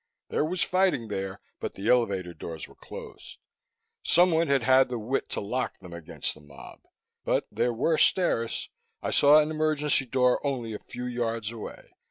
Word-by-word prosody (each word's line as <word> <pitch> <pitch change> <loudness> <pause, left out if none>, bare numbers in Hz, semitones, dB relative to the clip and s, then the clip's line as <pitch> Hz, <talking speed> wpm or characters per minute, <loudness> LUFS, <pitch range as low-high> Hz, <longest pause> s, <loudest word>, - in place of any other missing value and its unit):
There - - +1
was 175 +3 0
fighting 185 - +1
there, 95 -1 -4 0.2
but - - -5
the 100 +3 -5
elevator 100 -8 +2
doors 80 -2 -7
were - - -17
closed. - - -11 0.6
Someone 170 -1 +4
had 140 -3 +2
had 130 0 +5
the 125 - -3
wit 115 +5 -2
to - - -2
lock 125 +5 -3
them 90 -2 -12
against 85 -2 -3
the 75 - -16
mob. 70 -1 -13 0.4
But - - +1
there 120 - +1
were 150 +7 +1
stairs; 115 -13 +2 0.3
I - - -1
saw 145 +1 +7
an 155 +1 +1
emergency 150 -3 +1
door 125 0 +2
only 125 -6 -2
a 105 - -5
few 125 0 -8
yards 115 -3 -2
away. 115 -2 -9
125 Hz, 175 wpm, -27 LUFS, 105-150 Hz, 0.6 s, saw